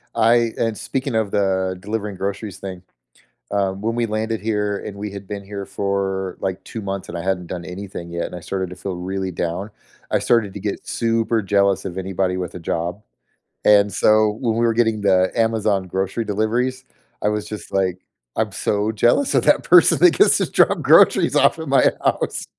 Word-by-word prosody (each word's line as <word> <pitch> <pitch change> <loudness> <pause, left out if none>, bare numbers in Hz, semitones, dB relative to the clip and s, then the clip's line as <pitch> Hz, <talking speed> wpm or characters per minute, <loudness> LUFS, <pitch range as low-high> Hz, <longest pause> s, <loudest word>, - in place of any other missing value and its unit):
I 115 0 +3
and 115 -2 -1
speaking 135 -2 -3
of 110 -3 0
the 95 -2 0
delivering 105 +1 -4
groceries 100 +1 -4
thing, 95 -2 -7 0.7
um, 100 -1 -1
when 115 +2 -1
we 120 - +1
landed 110 0 -2
here 105 -2 -1
and 100 - -7
we 105 0 -5
had 100 -1 -9
been 100 -1 -6
here 100 0 -6
for, 95 -1 -2
like, 95 0 -3
2 115 - -7
months 100 -1 -4
and 85 - -6
I 85 - -4
hadn't 90 -2 -1
done 90 -2 -5
anything 90 -2 -7
yet 85 0 -2
and - - -7
I - - -6
started 95 +2 -4
to - - -7
feel 95 0 -5
really 95 +1 -3
down, 90 +4 -3 0.4
I - - +3
started 110 -5 +1
to 100 - -7
get 100 +1 -4
super 115 -1 0
jealous 100 0 +1
of 95 0 -5
anybody 95 -1 -1
with 90 -1 -5
a - - -6
job, 85 +4 -3 0.6
and 105 -1 +5
so 110 +2 +4
when 115 -3 0
we 120 - +2
were 115 - +2
getting 110 -2 +1
the 95 -2 +3
Amazon 110 -4 +1
grocery 95 +5 -2
deliveries, 120 +5 -1 0.4
I 105 - +2
was 105 0 -2
just 105 - -8
like, 95 -2 +1 0.4
"I'm 110 -2 0
so 105 +3 -1
jealous 120 - +2
of - - +3
that - - +4
person - - +6
that 360 - +7
gets 410 - +5
to - - -1
drop - - +3
groceries - - +5
off - - +4
of - - -6
my - - +4
house." - - -1
100 Hz, 200 wpm, -21 LUFS, 95-110 Hz, 0.7 s, that